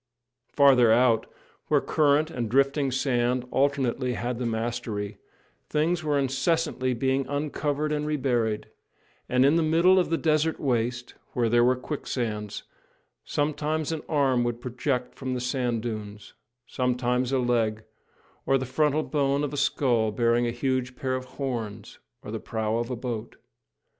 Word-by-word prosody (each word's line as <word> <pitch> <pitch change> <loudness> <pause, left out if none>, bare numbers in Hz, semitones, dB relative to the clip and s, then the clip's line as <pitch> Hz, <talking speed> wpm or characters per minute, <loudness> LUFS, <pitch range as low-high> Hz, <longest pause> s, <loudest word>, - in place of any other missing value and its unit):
Farther 130 -5 +5
out, 115 -1 +3 0.4
where - - +4
current 155 +1 +2
and 120 -5 -3
drifting 140 +3 +2
sand 125 -1 0
alternately 135 -2 +1
had 120 0 -3
the 125 - -1
mastery, 110 -3 -3 0.5
things 165 +3 +1
were 150 -2 +1
incessantly 135 0 0
being 130 +2 0
uncovered 145 +1 -2
and 150 0 -1
reburied; 120 -7 0 0.6
and 125 +1 +4
in 145 +4 +4
the - - +3
middle 170 +4 +4
of 180 - 0
the 165 - +1
desert 160 0 +1
waste, 120 -2 -1 0.2
where 120 -2 +1
there 120 +1 +4
were 125 +1 +4
quicksands, 120 -6 -4 0.6
sometimes 150 +1 -1
an 160 -2 -3
arm 135 -5 +2
would 120 -1 -2
project 125 +1 -2
from 130 -1 -4
the - - -2
sand 125 -2 -1
dunes, 105 -3 -6 0.3
sometimes 125 0 0
a 135 - +2
leg, 115 -3 0 0.6
or 135 - +4
the 130 - -3
frontal 150 +3 +1
bone 140 -1 0
of 145 - -3
a - - -2
skull 125 -5 +1
bearing 120 +1 +2
a - - -1
huge 125 0 -1
pair 130 -1 -2
of 130 0 -3
horns, 115 -6 -5 0.2
or - - -7
the - - -3
prow 110 0 -2
of 120 +1 -2
a 125 - -2
boat. 120 -2 -5
130 Hz, 155 wpm, -26 LUFS, 120-145 Hz, 0.6 s, Farther